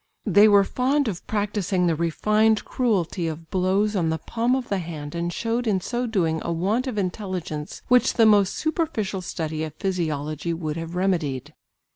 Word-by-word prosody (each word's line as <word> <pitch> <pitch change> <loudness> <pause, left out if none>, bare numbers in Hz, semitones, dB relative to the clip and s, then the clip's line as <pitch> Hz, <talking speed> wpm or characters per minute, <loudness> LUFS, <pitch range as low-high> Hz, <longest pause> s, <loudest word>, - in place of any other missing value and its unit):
They 205 +1 +6
were 200 -1 +6
fond 265 +6 +1
of 190 -4 -5
practising 200 -3 0
the 165 -2 +2
refined 215 +7 +2
cruelty 190 -8 0
of 160 0 -7
blows 195 +3 +1
on 170 -4 +1
the 160 - 0
palm 235 - 0
of 260 -2 -3
the 200 - -1
hand 155 -4 -6
and 170 0 -2
showed 230 +4 -2
in 200 -3 +2
so 240 +6 -2
doing 165 -8 0
a 170 - -2
want 200 +10 0
of 245 -5 -3
intelligence 185 -6 -4
which 250 0 +4
the 225 - +5
most 205 -3 +4
superficial 300 - -1
study 160 -3 -3
of 155 -1 -6
physiology 160 -4 -2
would 155 -2 -3
have 165 +1 -6
remedied. 170 -9 -1
190 Hz, 175 wpm, -24 LUFS, 165-215 Hz, -, They